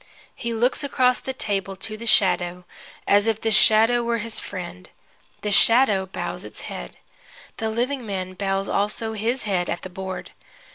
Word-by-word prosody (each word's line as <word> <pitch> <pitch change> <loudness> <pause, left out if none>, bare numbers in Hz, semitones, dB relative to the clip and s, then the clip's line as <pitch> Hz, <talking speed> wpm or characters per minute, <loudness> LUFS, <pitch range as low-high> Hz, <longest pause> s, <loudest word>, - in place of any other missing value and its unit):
He 235 - -4
looks 240 +5 +1
across 255 -3 +2
the 265 - -5
table 195 -6 -3
to 215 +3 -5
the 230 +2 -8
shadow, 180 -3 +3 0.4
as 205 +2 +4
if 220 -1 +1
the 225 - -1
shadow 225 +3 +5
were 235 0 0
his 230 0 -2
friend. 185 -1 -8 0.5
The 210 - -2
shadow 210 -2 +5
bows 180 -1 -5
its 105 - -9
head. - - -8 0.6
The 220 - -2
living 250 +4 -2
man 190 -3 -4
bows 195 0 -2
also 215 +2 -1
his 230 +4 -1
head 190 -4 -1
at 175 - -3
the 185 - -8
board. 190 0 -6
210 Hz, 170 wpm, -23 LUFS, 190-230 Hz, 0.6 s, shadow